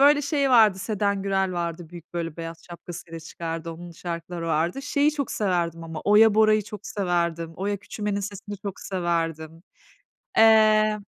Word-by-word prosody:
Böyle 290 Hz, +1 st, +6 dB
şey 280 Hz, -1 st, +1 dB
vardı, 220 Hz, -6 st, +6 dB
Seden 200 Hz, -1 st, -1 dB
Gürel 195 Hz, -1 st, 0 dB
vardı, 170 Hz, -1 st, -4 dB
büyük, 170 Hz, -1 st, -13 dB
böyle, 165 Hz, -2 st, -3 dB
beyaz 165 Hz, 0 st, -6 dB
şapkasıyla 170 Hz, -1 st, -9 dB
çıkardı, 165 Hz, 0 st, -6 dB
onun 175 Hz, +1 st, -10 dB
şarkıları 170 Hz, 0 st, -6 dB
vardı. 165 Hz, -, 0 dB
Şeyi 290 Hz, +1 st, +2 dB
çok 280 Hz, -4 st, -3 dB
severdim 170 Hz, -5 st, -1 dB
ama, 160 Hz, -1 st, -6 dB
Oya 210 Hz, +1 st, +6 dB
Bora'yı 215 Hz, 0 st, +4 dB
çok 205 Hz, 0 st, -9 dB
severdim, 170 Hz, -4 st, -1 dB
Oya 200 Hz, +2 st, -1 dB
Küçümen'in 205 Hz, 0 st, -4 dB
sesini 200 Hz, +1 st, -6 dB
çok 200 Hz, -3 st, -6 dB
severdim. 165 Hz, -3 st, -2 dB, 0.8 s
Eee 215 Hz, -1 st, +5 dB
185 Hz, 150 wpm, -25 LUFS, 170-215 Hz, 0.8 s, Böyle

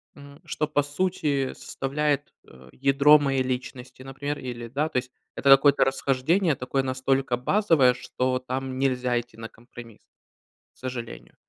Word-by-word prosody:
м, 140 Hz, +1 st, -14 dB
что 150 Hz, -1 st, -2 dB
по 145 Hz, -1 st, +1 dB
сути 145 Hz, -3 st, -1 dB
составляет, 145 Hz, +1 st, -2 dB, 0.2 s
э, 65 Hz, 0 st, -17 dB
ядро 140 Hz, +3 st, +5 dB
моей 135 Hz, -2 st, 0 dB
личности, 130 Hz, 0 st, -6 dB
например, 145 Hz, +2 st, -5 dB
или, 120 Hz, -2 st, -7 dB
да, 145 Hz, +6 st, -1 dB
то -, -, -3 dB
есть 125 Hz, 0 st, -10 dB, 0.2 s
это 140 Hz, -, 0 dB
какое-то 140 Hz, +1 st, +6 dB
расхождение, 140 Hz, +6 st, +1 dB
такое 130 Hz, +2 st, -2 dB
настолько 130 Hz, -1 st, 0 dB
базовое, 140 Hz, -, +3 dB
что 130 Hz, +1 st, -2 dB
там 130 Hz, +1 st, -5 dB
нельзя 125 Hz, -2 st, 0 dB
идти 120 Hz, -1 st, -11 dB
на 115 Hz, 0 st, -8 dB
компромисс, 115 Hz, -1 st, -14 dB, 0.7 s
к -, -, -29 dB
сожалению. 125 Hz, -2 st, -7 dB
135 Hz, 145 wpm, -25 LUFS, 125-145 Hz, 0.7 s, какое-то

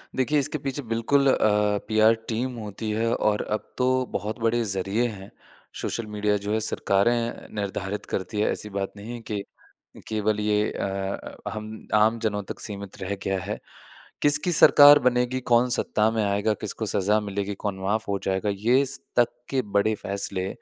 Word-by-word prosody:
देखिए, 145 Hz, +3 st, +2 dB
इसके 145 Hz, +2 st, 0 dB
पीछे 140 Hz, 0 st, -4 dB
बिल्कुल 120 Hz, +4 st, +1 dB
अ, -, -, +3 dB, 0.5 s
पीआर 110 Hz, 0 st, +5 dB, 0.2 s
टीम 125 Hz, +3 st, -2 dB
होती 110 Hz, 0 st, -5 dB
है 110 Hz, +2 st, 0 dB
और 105 Hz, -1 st, +1 dB
अब 105 Hz, -, -3 dB
तो 125 Hz, -, +2 dB, 0.2 s
बहुत 105 Hz, +4 st, -3 dB
बड़े 115 Hz, +1 st, +1 dB
ज़रिए 100 Hz, +3 st, -1 dB
हैं, 100 Hz, -4 st, -9 dB, 0.5 s
सोशल 115 Hz, -, -3 dB
मीडिया 105 Hz, 0 st, 0 dB
जो 100 Hz, +1 st, -3 dB
है 110 Hz, -, +2 dB
सरकारें 115 Hz, +3 st, 0 dB
निर्धारित 100 Hz, 0 st, -3 dB
करती 100 Hz, +3 st, -3 dB
हैं, -, -, +2 dB
ऐसी 105 Hz, -, -5 dB
बात 100 Hz, -1 st, -3 dB
नहीं 105 Hz, +4 st, -7 dB
है 120 Hz, -, -6 dB
कि 105 Hz, -1 st, -1 dB, 0.7 s
केवल 105 Hz, -1 st, 0 dB
ये 105 Hz, 0 st, +1 dB
अ -, -, -3 dB, 0.6 s
अ, -, -, 0 dB
हम 110 Hz, 0 st, -8 dB
आमजनों 110 Hz, -1 st, +2 dB
तक -, -, -8 dB
सीमित 100 Hz, -3 st, -7 dB
रह 95 Hz, +2 st, -2 dB
गया 95 Hz, -1 st, -1 dB
है। 100 Hz, +4 st, -4 dB, 0.6 s
किसकी 150 Hz, +4 st, +4 dB
सरकार 145 Hz, -1 st, +9 dB
बनेगी, 125 Hz, 0 st, +1 dB
कौन 120 Hz, 0 st, +3 dB
सत्ता 110 Hz, -2 st, +1 dB
में 110 Hz, -1 st, 0 dB
आएगा, 100 Hz, +2 st, +1 dB
किसको 110 Hz, +1 st, -4 dB
सज़ा 105 Hz, +2 st, +2 dB
मिलेगी, 100 Hz, 0 st, -3 dB
कौन 100 Hz, -1 st, -4 dB
माफ़ 105 Hz, +3 st, -1 dB
हो 100 Hz, -1 st, 0 dB
जाएगा, 95 Hz, +2 st, 0 dB
ये 120 Hz, +7 st, +3 dB
स 135 Hz, -, -7 dB, 0.2 s
तक 120 Hz, -1 st, +6 dB, 0.2 s
के 135 Hz, -1 st, +1 dB, 0.2 s
बड़े 110 Hz, +2 st, +3 dB
फैसले 100 Hz, -2 st, -3 dB
110 Hz, 175 wpm, -25 LUFS, 100-120 Hz, 0.7 s, सरकार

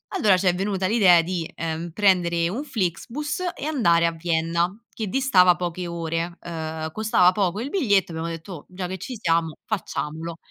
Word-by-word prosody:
Allora 195 Hz, -4 st, +4 dB
ci 185 Hz, 0 st, 0 dB
è 180 Hz, -, +3 dB
venuta 190 Hz, -1 st, -1 dB
l'idea 190 Hz, -6 st, +6 dB
di, 170 Hz, -1 st, -3 dB
ehm, 165 Hz, +1 st, -4 dB
prendere 175 Hz, -3 st, +2 dB
un 250 Hz, +10 st, -3 dB
Flixbus 245 Hz, -, -3 dB
e -, -, -6 dB
andare 170 Hz, -, +3 dB
a -, -, 0 dB
Vienna 170 Hz, +2 st, 0 dB, 0.2 s
che 220 Hz, -3 st, -4 dB
distava 185 Hz, -8 st, +4 dB
poche 175 Hz, 0 st, -4 dB
ore, 170 Hz, 0 st, -3 dB
uhm, 160 Hz, -2 st, -5 dB
costava 195 Hz, -3 st, +3 dB
poco 195 Hz, 0 st, 0 dB
il 260 Hz, +5 st, -4 dB
biglietto, 205 Hz, -, +2 dB
abbiamo 165 Hz, +1 st, -4 dB
detto: 165 Hz, +3 st, -7 dB
"Oh, 150 Hz, -, -10 dB
già 180 Hz, 0 st, -5 dB
che 190 Hz, +1 st, -5 dB
ci 245 Hz, +8 st, -6 dB
siamo, 165 Hz, -2 st, +1 dB
facciamolo." 165 Hz, -5 st, -4 dB
175 Hz, 175 wpm, -24 LUFS, 165-200 Hz, 0.2 s, l'idea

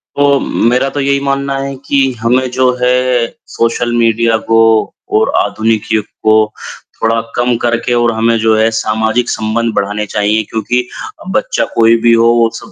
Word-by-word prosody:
तो, 140 Hz, -1 st, +3 dB
मेरा 125 Hz, +4 st, 0 dB
तो 145 Hz, -, -5 dB
यही 140 Hz, 0 st, +1 dB
मानना 140 Hz, 0 st, -1 dB
है 135 Hz, 0 st, -4 dB
कि 135 Hz, -1 st, +2 dB
हमें 125 Hz, +3 st, +1 dB
जो 130 Hz, 0 st, +2 dB
है, 125 Hz, -1 st, +1 dB, 0.2 s
सोशल 120 Hz, +1 st, -1 dB
मीडिया 115 Hz, -1 st, +2 dB
को 115 Hz, 0 st, +4 dB, 0.6 s
और 110 Hz, -, +1 dB
आधुनिक 110 Hz, +1 st, 0 dB
युग 110 Hz, -2 st, 0 dB, 0.2 s
को 110 Hz, 0 st, +3 dB, 0.5 s
थोड़ा 115 Hz, 0 st, +1 dB, 0.2 s
कम 120 Hz, 0 st, +1 dB
करके 120 Hz, 0 st, 0 dB
और 120 Hz, -1 st, +2 dB
हमें 115 Hz, +1 st, +1 dB
जो 110 Hz, 0 st, +2 dB
है 110 Hz, +1 st, +3 dB
सामाजिक 110 Hz, +2 st, 0 dB
संबंध 110 Hz, +1 st, -1 dB
बढ़ाने 105 Hz, +1 st, -2 dB
चाहिए 105 Hz, +1 st, +1 dB
क्योंकि 115 Hz, +3 st, -1 dB, 0.4 s
अ, -, -, -13 dB
बच्चा -, -, 0 dB
कोई 115 Hz, 0 st, +4 dB
भी 115 Hz, 0 st, +4 dB
हो, 115 Hz, 0 st, +4 dB
वो 115 Hz, -1 st, +3 dB
सब -, -, -10 dB
115 Hz, 170 wpm, -13 LUFS, 110-125 Hz, 0.6 s, को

